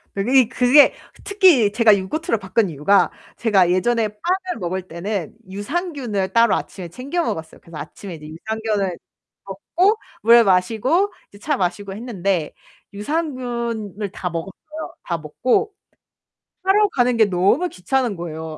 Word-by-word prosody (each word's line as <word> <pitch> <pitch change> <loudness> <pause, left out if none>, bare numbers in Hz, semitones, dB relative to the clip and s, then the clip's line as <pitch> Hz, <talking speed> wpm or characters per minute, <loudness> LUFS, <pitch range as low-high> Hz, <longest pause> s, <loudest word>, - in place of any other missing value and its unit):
그게 245 +5 +3
그게 255 +4 +5 0.3
특히 360 - +4
제가 215 -1 +5
요거트를 230 - -2
바꾼 195 +1 0
이유가 165 +6 +2 0.3
제가 195 -6 +3
예전에 225 +5 +1
빵을 360 - -3
먹을 185 0 -3
때는 175 +1 -4 0.2
유산균을 240 - -3
따로 230 -1 +4
아침에 180 -3 -6
챙겨 275 - -3
먹었어요. 160 - -5
그래서 165 -2 -11
아침에 170 +5 -8
이제 150 -1 -11
유산균을 205 +2 -3 0.5
먹고 345 - +1 0.3
물을 235 +2 +7
마시고 225 - +2 0.2
이제 200 - -16
차 295 +6 -1
마시고 195 +1 -2
했는데 195 -7 -2 0.4
유산균을 235 - -3
다 180 - -4
먹었어요. 195 - -7
다 170 - -2
먹고 245 - 0 0.9
사러 405 +2 +4
가는 250 -6 +1
게 220 - +6
너무 200 - +2
귀찮은 245 - -1
거예요. 160 -2 -6
215 Hz, 310 characters per minute, -21 LUFS, 185-260 Hz, 0.9 s, 물을